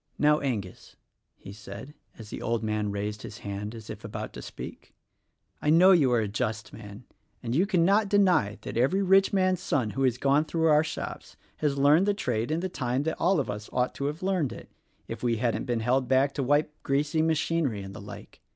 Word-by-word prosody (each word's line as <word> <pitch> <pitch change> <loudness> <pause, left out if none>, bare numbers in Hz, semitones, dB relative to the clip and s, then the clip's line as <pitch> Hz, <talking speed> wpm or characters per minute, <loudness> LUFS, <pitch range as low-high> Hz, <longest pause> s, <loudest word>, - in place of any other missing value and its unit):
"Now, 150 0 +4
Angus," 110 -10 -4 0.4
he 100 - -11
said, 105 +6 -10 0.2
as 110 -2 -11
the - - -6
old 115 -1 -1
man 105 -1 -1
raised 105 +1 -4
his 105 - -8
hand 100 +2 -5
as 110 -1 -10
if 110 0 -8
about 105 - -6
to - - -8
speak, - - -10 0.7
"I 150 - 0
know 175 +5 +7
you 150 -9 +4
are 120 -2 +3
a 105 - -1
just 110 0 -3
man, 105 +1 -10 0.4
and 115 -1 -2
you 175 +9 +2
cannot 195 +2 +3
deny 180 - +3
that - - -5
every 170 +12 +2
rich 195 +1 +4
man's 185 -2 +1
son 120 -7 0
who 135 - -4
has 125 -2 +2
gone 140 +3 +2
through 160 +1 +1
our 150 0 +5
shops 160 - -6 0.2
has 145 -2 0
learned 150 +7 +4
the 205 - +2
trade 120 - -2
in 160 +2 -1
the 185 - -1
time 130 -6 -2
that 160 +1 -3
all 180 0 +3
of 140 - -1
us 105 0 -6
ought 125 0 0
to 140 - -4
have 150 +5 -4
learned 185 -9 0
it, - - -11 0.4
if 115 -1 -6
we 120 -2 +1
hadn't 120 0 -1
been 120 -3 -1
held 125 +3 +1
back 135 +2 +3
to 145 - -2
wipe 145 +3 +1
greasy 145 +3 0
machinery, 160 -8 0
and 95 0 -9
the 110 - -9
like. 105 0 -11
135 Hz, 215 wpm, -27 LUFS, 110-160 Hz, 0.7 s, know